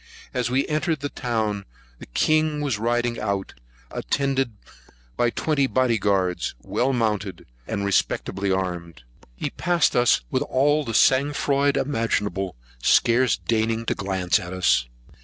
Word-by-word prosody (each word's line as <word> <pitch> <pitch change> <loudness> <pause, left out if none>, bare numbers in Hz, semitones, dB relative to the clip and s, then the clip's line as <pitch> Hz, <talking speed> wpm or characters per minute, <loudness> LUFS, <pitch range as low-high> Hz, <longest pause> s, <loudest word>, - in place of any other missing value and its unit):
As 125 -2 -1
we 130 +2 +1
entered 155 0 -1
the 145 - -2
town, 110 -6 -2 0.4
the - - -11
king 155 - +1
was 140 -8 -1
riding 120 +1 0
out, 100 -2 -2 0.4
attended 135 -4 -1 0.6
by 120 - +2
twenty 140 +2 0
carabineers - - -13
or - - -18
body 120 -3 +2
guards, 95 -7 0
well 130 +2 0
mounted, 105 -6 -1 0.2
and 100 -2 -2
respectably 100 0 0
armed. 90 -6 -3 0.3
He - - -4
passed 175 -1 +1
us 120 -1 +4
with - - +1
all 145 +3 +2
the 115 -5 -4
sang 135 +5 +4
froid 140 0 +1
imaginable, 105 - -1 0.3
scarce 120 - +4
deigning 115 0 -1
to - - +1
glance 95 -2 0
at 90 +1 -7
us. 90 -9 +2
115 Hz, 145 wpm, -24 LUFS, 100-135 Hz, 0.6 s, us